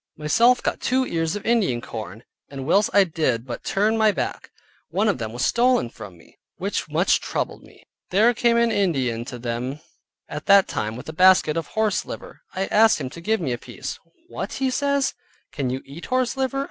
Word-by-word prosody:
Myself 230 Hz, +12 st, +3 dB
got -, -, -2 dB
two 260 Hz, +1 st, +1 dB
ears 165 Hz, -5 st, -1 dB
of 205 Hz, -, -6 dB
Indian 220 Hz, -, +2 dB
corn, 110 Hz, -1 st, -8 dB, 0.3 s
and 135 Hz, -2 st, -7 dB
whilst 200 Hz, +7 st, +3 dB
I 200 Hz, +1 st, +6 dB
did 150 Hz, -9 st, -1 dB
but 120 Hz, -2 st, -6 dB
turn 210 Hz, +3 st, +1 dB
my 215 Hz, -1 st, +5 dB
back, -, -, -4 dB, 0.4 s
one 210 Hz, +3 st, +1 dB
of 205 Hz, -, +1 dB
them 110 Hz, -1 st, -4 dB
was 120 Hz, +2 st, -1 dB
stolen 245 Hz, -, +2 dB
from 90 Hz, -4 st, -11 dB
me, 80 Hz, -, -22 dB, 0.2 s
which -, -, -3 dB
much -, -, +2 dB
troubled -, -, -3 dB
me. -, -, -19 dB, 0.2 s
There 220 Hz, +6 st, +4 dB
came 235 Hz, 0 st, +2 dB
an 235 Hz, 0 st, +3 dB
Indian 135 Hz, -, 0 dB
to 125 Hz, -, -7 dB
them 120 Hz, +4 st, -4 dB, 0.5 s
at 150 Hz, 0 st, -7 dB
that 200 Hz, -1 st, +6 dB
time 110 Hz, +1 st, -3 dB
with 125 Hz, -, -9 dB
a 160 Hz, -, -6 dB
basket 185 Hz, -2 st, +5 dB
of 165 Hz, -, -2 dB
horse 220 Hz, -2 st, 0 dB
liver. -, -, -9 dB
I 195 Hz, -, 0 dB
asked 220 Hz, -1 st, +4 dB
him 130 Hz, -3 st, -5 dB
to 170 Hz, -, -10 dB
give 220 Hz, +5 st, +1 dB
me 140 Hz, -8 st, -2 dB
a 120 Hz, -, -4 dB
piece. -, -, -7 dB, 0.3 s
"What," -, -, -5 dB
says 275 Hz, +1 st, +1 dB
he, -, -, -31 dB
"can 135 Hz, -3 st, -1 dB
you 130 Hz, +1 st, -4 dB
eat 145 Hz, +5 st, -10 dB
horse 255 Hz, -1 st, 0 dB
liver?" 265 Hz, 0 st, -1 dB
185 Hz, 205 wpm, -23 LUFS, -, 0.5 s, I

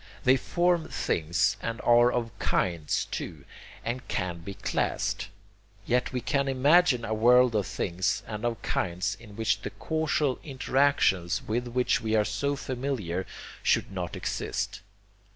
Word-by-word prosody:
They 130 Hz, -, +6 dB
form 175 Hz, +4 st, +1 dB
'things' 80 Hz, +1 st, 0 dB
and 115 Hz, +1 st, -3 dB
are 120 Hz, +1 st, +5 dB
of 115 Hz, -2 st, -2 dB
'kinds' 85 Hz, -4 st, 0 dB
too, 75 Hz, -5 st, -5 dB, 0.4 s
and 125 Hz, +2 st, -3 dB
can 90 Hz, -2 st, -2 dB
be 100 Hz, +4 st, -8 dB
classed. 100 Hz, -, -1 dB, 0.6 s
Yet 125 Hz, +1 st, +1 dB
we 125 Hz, -1 st, -2 dB
can 140 Hz, +2 st, 0 dB
imagine 135 Hz, -1 st, +4 dB
a 110 Hz, -, -2 dB
world 125 Hz, +2 st, +5 dB
of 105 Hz, -3 st, +1 dB
things 90 Hz, +1 st, -1 dB
and 105 Hz, 0 st, -6 dB
of 120 Hz, -3 st, -1 dB
kinds 90 Hz, +3 st, -1 dB
in 110 Hz, -3 st, -13 dB
which 110 Hz, +1 st, 0 dB
the -, -, -4 dB
causal 155 Hz, -4 st, -1 dB
interactions 135 Hz, -, +1 dB
with 120 Hz, +3 st, -1 dB
which 125 Hz, +1 st, +1 dB
we 110 Hz, -1 st, 0 dB
are 105 Hz, -1 st, +3 dB
so 140 Hz, +7 st, -1 dB
familiar 125 Hz, -10 st, -3 dB, 0.3 s
should -, -, +2 dB
not 90 Hz, -3 st, -4 dB
exist. -, -, -3 dB
120 Hz, 145 wpm, -28 LUFS, 95-130 Hz, 0.6 s, They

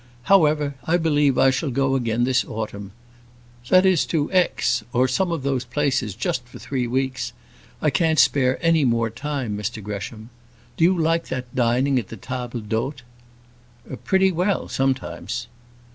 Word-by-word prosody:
However, 150 Hz, -4 st, +3 dB
I 170 Hz, +2 st, +2 dB
believe 150 Hz, -5 st, +2 dB
I 135 Hz, -, +5 dB
shall 135 Hz, +3 st, -2 dB
go 135 Hz, +1 st, +1 dB
again 120 Hz, -3 st, 0 dB
this 130 Hz, 0 st, +2 dB
autumn. 105 Hz, -3 st, -6 dB, 0.8 s
That 185 Hz, +1 st, +6 dB
is 185 Hz, -4 st, +4 dB
to 150 Hz, -3 st, -1 dB
Aix, 180 Hz, -1 st, +2 dB
or 125 Hz, +2 st, +3 dB
some 175 Hz, +8 st, 0 dB
of 165 Hz, -5 st, -3 dB
those 135 Hz, -2 st, 0 dB
places; 130 Hz, -5 st, -1 dB
just 120 Hz, +2 st, -2 dB
for 125 Hz, -, -12 dB
three 130 Hz, -3 st, -3 dB
weeks. 130 Hz, 0 st, -2 dB, 0.5 s
I 150 Hz, -, +3 dB
can't 160 Hz, -1 st, +2 dB
spare 130 Hz, -3 st, +3 dB
any 165 Hz, -2 st, +4 dB
more 115 Hz, -3 st, +1 dB
time, 130 Hz, -3 st, -3 dB
Mr 105 Hz, +1 st, -4 dB
Gresham. 105 Hz, +3 st, -7 dB, 0.4 s
Do -, -, 0 dB
you 185 Hz, +1 st, +3 dB
like 165 Hz, +1 st, +1 dB
that 125 Hz, -1 st, -5 dB
dining 125 Hz, +2 st, +2 dB
at 110 Hz, -, -6 dB
the 115 Hz, -, -9 dB
tables 125 Hz, -2 st, -5 dB
d'hôte?" 120 Hz, +6 st, -2 dB, 1.0 s
"Pretty 190 Hz, 0 st, +3 dB
well, 180 Hz, +3 st, 0 dB
sometimes." 130 Hz, -2 st, -2 dB
130 Hz, 160 wpm, -22 LUFS, 120-155 Hz, 1.0 s, That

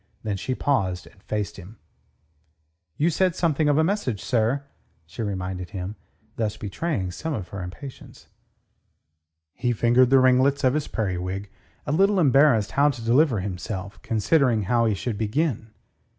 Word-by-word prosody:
Then 105 Hz, -2 st, -2 dB
she 130 Hz, +6 st, -3 dB
paused 95 Hz, -12 st, 0 dB
and 100 Hz, -, -19 dB
faced 105 Hz, -1 st, -3 dB
him. 100 Hz, +4 st, -12 dB, 1.2 s
"You 165 Hz, +4 st, +2 dB
said 185 Hz, +2 st, +1 dB
something 155 Hz, -4 st, +1 dB
of 145 Hz, -, +3 dB
a 160 Hz, -, +4 dB
message, 165 Hz, -, -1 dB
sir," 120 Hz, +6 st, 0 dB, 0.4 s
she 80 Hz, +8 st, -8 dB
reminded 95 Hz, -3 st, -4 dB
him, 95 Hz, 0 st, -5 dB, 0.4 s
thus 110 Hz, -2 st, -1 dB
betraying 105 Hz, -, -3 dB
some 155 Hz, -, -4 dB
of 95 Hz, -6 st, -6 dB
her 100 Hz, -, -6 dB
impatience. 95 Hz, +10 st, -10 dB, 1.3 s
He 120 Hz, 0 st, -1 dB
fingered 120 Hz, +2 st, +4 dB
the 135 Hz, -, +6 dB
ringlets 130 Hz, +2 st, +3 dB
of 130 Hz, -1 st, +4 dB
his 150 Hz, -1 st, -1 dB
periwig, 95 Hz, -1 st, -3 dB, 0.3 s
a 145 Hz, -, -2 dB
little 195 Hz, +5 st, +3 dB
embarrassed 135 Hz, -, +4 dB
how 145 Hz, +1 st, +4 dB
to 120 Hz, -5 st, -5 dB
deliver 125 Hz, -2 st, +3 dB
himself, 95 Hz, +1 st, -5 dB
considering 115 Hz, +1 st, +2 dB
how 115 Hz, +4 st, +2 dB
he 110 Hz, -, +1 dB
should 105 Hz, +1 st, -4 dB
begin. 115 Hz, +1 st, -1 dB
115 Hz, 150 wpm, -24 LUFS, 100-140 Hz, 1.3 s, the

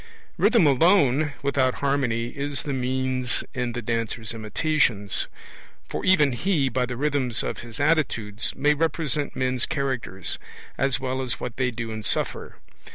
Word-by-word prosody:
Rhythm 230 Hz, -9 st, +5 dB
alone, 150 Hz, -1 st, +4 dB
without 135 Hz, -2 st, +2 dB
harmony, 130 Hz, -5 st, 0 dB
is 140 Hz, 0 st, -3 dB
the 145 Hz, -, -3 dB
means 130 Hz, -1 st, 0 dB
in 125 Hz, -3 st, -2 dB
the 120 Hz, -, -4 dB
dancer's 115 Hz, 0 st, -2 dB
imitations; 110 Hz, -2 st, +1 dB, 0.6 s
for -, -, -4 dB
even 150 Hz, -7 st, +5 dB
he, 145 Hz, +1 st, +1 dB
by 125 Hz, +1 st, 0 dB
the 120 Hz, -1 st, -5 dB
rhythms 135 Hz, -4 st, +1 dB
of -, -, -3 dB
his 115 Hz, +1 st, -8 dB
attitudes, 130 Hz, -9 st, 0 dB
may 150 Hz, +2 st, +3 dB
represent 150 Hz, -2 st, -1 dB
men's 130 Hz, -1 st, +1 dB
characters, 130 Hz, -, -2 dB, 0.4 s
as 135 Hz, -1 st, +1 dB
well 130 Hz, 0 st, -2 dB
as 125 Hz, -2 st, -2 dB
what 125 Hz, -2 st, -5 dB
they 130 Hz, -1 st, +1 dB
do 115 Hz, -1 st, -5 dB
and 110 Hz, 0 st, -5 dB
suffer. -, -, -1 dB
130 Hz, 150 wpm, -25 LUFS, 120-145 Hz, 0.6 s, Rhythm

